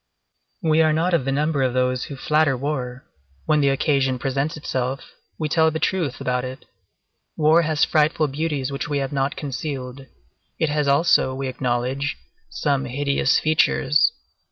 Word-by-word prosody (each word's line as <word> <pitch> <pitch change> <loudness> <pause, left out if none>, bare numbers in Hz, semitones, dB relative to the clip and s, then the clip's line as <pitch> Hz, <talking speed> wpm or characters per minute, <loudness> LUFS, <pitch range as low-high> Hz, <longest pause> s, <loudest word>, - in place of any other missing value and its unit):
We 160 0 +3
are 155 -1 +3
not 170 +3 +1
of 165 -7 +2
the 135 - 0
number 150 +1 0
of 130 -1 0
those 125 0 0
who 140 - -7
flatter 150 0 +1
war; 130 -1 -4 0.4
when 150 -1 +2
the 140 - +3
occasion 135 -1 +1
presents 140 +5 -2
itself, 130 -2 -3 0.3
we 155 - -2
tell 160 +1 +3
the 160 - -3
truth 165 -5 -1
about 125 0 -1
it. 130 +1 -7 0.7
War 155 +2 +5
has 155 -2 +2
frightful 155 0 +2
beauties 145 -1 -2
which 140 +1 -4
we 145 - 0
have 135 +1 -2
not 135 0 -1
concealed; 135 -2 -5 0.5
it 160 - 0
has 150 -1 0
also, 140 -2 +3
we 135 0 -3
acknowledge, 130 +3 -2 0.3
some 140 -2 -1
hideous 140 +2 +1
features. 155 -1 +3
140 Hz, 160 wpm, -22 LUFS, 130-155 Hz, 0.7 s, War